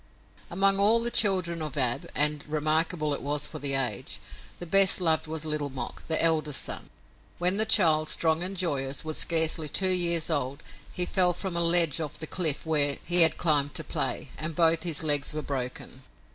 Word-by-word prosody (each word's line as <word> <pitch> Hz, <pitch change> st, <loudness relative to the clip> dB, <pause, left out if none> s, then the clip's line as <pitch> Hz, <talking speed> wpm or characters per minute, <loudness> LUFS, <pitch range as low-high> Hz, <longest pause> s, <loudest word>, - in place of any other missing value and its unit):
Among 195 Hz, +2 st, +1 dB
all 215 Hz, +3 st, +3 dB
the 235 Hz, +1 st, -2 dB
children 185 Hz, -7 st, +1 dB
of 150 Hz, -2 st, -6 dB
Ab 125 Hz, -3 st, -1 dB
and 150 Hz, 0 st, +3 dB
remarkable 155 Hz, +1 st, -1 dB
it -, -, -5 dB
was 145 Hz, +1 st, -1 dB
for 155 Hz, -, -8 dB
the 140 Hz, -1 st, -1 dB
age 135 Hz, -2 st, -3 dB, 0.4 s
the 175 Hz, -, -9 dB
best 195 Hz, +3 st, +4 dB
loved 160 Hz, -3 st, 0 dB
was 160 Hz, 0 st, -4 dB
Little 150 Hz, -2 st, -3 dB
Mok, 130 Hz, -3 st, -7 dB
the 160 Hz, -, 0 dB
eldest 155 Hz, -3 st, +1 dB
son. -, -, -7 dB, 0.5 s
When 180 Hz, +3 st, +1 dB
the 220 Hz, +1 st, +2 dB
child, 155 Hz, -7 st, +3 dB
strong 160 Hz, 0 st, +2 dB
and 190 Hz, +2 st, -3 dB
joyous, 140 Hz, -5 st, -2 dB
was 155 Hz, -1 st, -4 dB
scarcely 160 Hz, -2 st, +1 dB
two 190 Hz, +5 st, +2 dB
years 170 Hz, -2 st, +1 dB
old, 140 Hz, 0 st, -3 dB, 0.3 s
he 180 Hz, -, -2 dB
fell 180 Hz, -1 st, +1 dB
from 180 Hz, 0 st, -5 dB
a 170 Hz, -, 0 dB
ledge 170 Hz, -2 st, +2 dB
off 150 Hz, -2 st, -6 dB
the 160 Hz, -, -6 dB
cliff 160 Hz, -3 st, -2 dB
where 145 Hz, -3 st, +1 dB
he 175 Hz, 0 st, +4 dB
had 160 Hz, -, +6 dB
climbed 145 Hz, -4 st, +1 dB
to -, -, -2 dB
play, -, -, -3 dB
and 155 Hz, 0 st, -3 dB
both 165 Hz, -1 st, +3 dB
his 165 Hz, -2 st, 0 dB
legs 145 Hz, -1 st, +2 dB
were 155 Hz, -, -5 dB
broken. 130 Hz, -1 st, -7 dB
160 Hz, 195 wpm, -25 LUFS, 150-175 Hz, 0.5 s, had